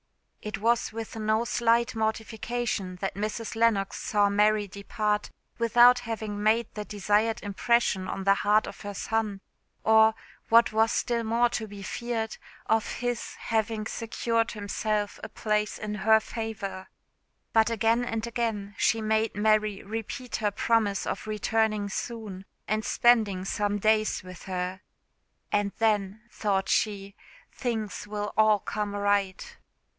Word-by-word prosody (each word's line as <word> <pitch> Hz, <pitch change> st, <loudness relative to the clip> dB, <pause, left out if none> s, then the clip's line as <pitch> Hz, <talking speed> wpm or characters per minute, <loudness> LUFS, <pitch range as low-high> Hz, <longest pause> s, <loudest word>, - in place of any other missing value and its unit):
It 210 Hz, 0 st, -4 dB
was 230 Hz, +3 st, +1 dB
with 225 Hz, 0 st, -6 dB
no 220 Hz, +1 st, +1 dB
slight 235 Hz, 0 st, +2 dB
mortification 220 Hz, -2 st, -2 dB
that 195 Hz, +2 st, -3 dB
Mrs. 215 Hz, +2 st, -4 dB
Lennox 225 Hz, -4 st, +2 dB
saw 205 Hz, -1 st, +2 dB
Mary 210 Hz, +1 st, +3 dB
depart 210 Hz, +1 st, -2 dB, 0.3 s
without 240 Hz, +2 st, +6 dB
having 220 Hz, -3 st, -4 dB
made 220 Hz, +2 st, +3 dB
the 210 Hz, -, -4 dB
desired 210 Hz, +3 st, 0 dB
impression 205 Hz, -1 st, +1 dB
on 195 Hz, -, -4 dB
the 195 Hz, +1 st, +5 dB
heart 210 Hz, +2 st, +3 dB
of -, -, -9 dB
her 205 Hz, -1 st, -6 dB
son; 215 Hz, -2 st, -2 dB, 0.4 s
or, 220 Hz, 0 st, +5 dB, 0.3 s
what 230 Hz, -1 st, +5 dB
was 220 Hz, +1 st, +3 dB
still 235 Hz, -1 st, 0 dB
more 230 Hz, +2 st, +2 dB
to 220 Hz, -1 st, -3 dB
be 200 Hz, -1 st, -9 dB
feared, 225 Hz, +1 st, -3 dB, 0.3 s
of 220 Hz, 0 st, +1 dB
his 245 Hz, -1 st, -3 dB
having 220 Hz, -1 st, -1 dB
secured 230 Hz, 0 st, -1 dB
himself 210 Hz, 0 st, -2 dB
a -, -, -5 dB
place 210 Hz, -1 st, -1 dB
in 210 Hz, -1 st, -4 dB
her 220 Hz, +2 st, +4 dB
favour. 215 Hz, -5 st, -5 dB, 0.7 s
But 225 Hz, 0 st, +4 dB
again 230 Hz, +1 st, +2 dB
and 225 Hz, -2 st, -2 dB
again 225 Hz, -4 st, -2 dB
she 225 Hz, -, +3 dB
made 220 Hz, 0 st, 0 dB
Mary 215 Hz, -1 st, +2 dB
repeat 225 Hz, +3 st, -5 dB
her 210 Hz, -, +1 dB
promise 205 Hz, -1 st, +1 dB
of -, -, -4 dB
returning 215 Hz, 0 st, 0 dB
soon, 210 Hz, -3 st, -5 dB, 0.2 s
and 215 Hz, +1 st, 0 dB
spending 215 Hz, -6 st, +3 dB
some 205 Hz, +1 st, 0 dB
days 215 Hz, 0 st, +2 dB
with 185 Hz, -1 st, -11 dB
her. 185 Hz, 0 st, -3 dB, 0.7 s
"And 205 Hz, -1 st, +1 dB
then," 210 Hz, -2 st, +1 dB
thought 195 Hz, -2 st, -1 dB
she, 200 Hz, -2 st, 0 dB, 0.4 s
"things 220 Hz, -5 st, -3 dB
will 210 Hz, 0 st, -4 dB
all 215 Hz, -1 st, +5 dB
come 205 Hz, 0 st, -4 dB
right. 205 Hz, -, 0 dB
215 Hz, 140 wpm, -27 LUFS, 205-225 Hz, 0.7 s, without